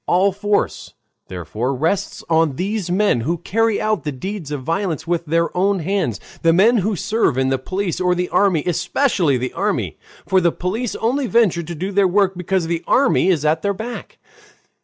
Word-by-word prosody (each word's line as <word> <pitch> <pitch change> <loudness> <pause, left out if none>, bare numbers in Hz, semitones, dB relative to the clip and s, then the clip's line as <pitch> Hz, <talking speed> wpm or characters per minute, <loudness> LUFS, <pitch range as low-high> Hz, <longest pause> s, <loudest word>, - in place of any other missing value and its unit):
All 190 +3 +3
force, 205 +1 -2 0.3
therefore, 105 - -3
rests 165 +9 -1
on 160 -4 +2
these 195 +2 -2
men, 185 - +2
who 165 +9 -1
carry 225 +5 0
out 215 -7 0
the 150 - -2
deeds 170 +4 -6
of 145 -3 -4
violence 165 0 -2
with 170 -1 -2
their 165 +2 0
own 195 +2 +2
hands, 175 - -1 0.2
the 165 - +4
men 220 +7 +5
who 210 +1 0
serve 215 - 0
in 130 0 +1
the 135 -1 0
police 185 +6 -3
or 180 0 +2
the 180 0 -2
army, 180 -3 +2
especially 175 - +1
the 125 +1 -4
army, - - -2 0.3
for 190 -1 +3
the 170 -1 +3
police 210 +8 -3
only 255 +4 0
venture 205 -5 +3
to 170 +1 -7
do 185 +6 -4
their 200 -1 +3
work 190 +1 +2
because 180 0 -1
the 165 0 -2
army 270 -7 +3
is 160 -5 +1
at 155 +1 +2
their 200 -1 -1
back. 235 +5 -7
180 Hz, 190 wpm, -20 LUFS, 160-200 Hz, 0.3 s, men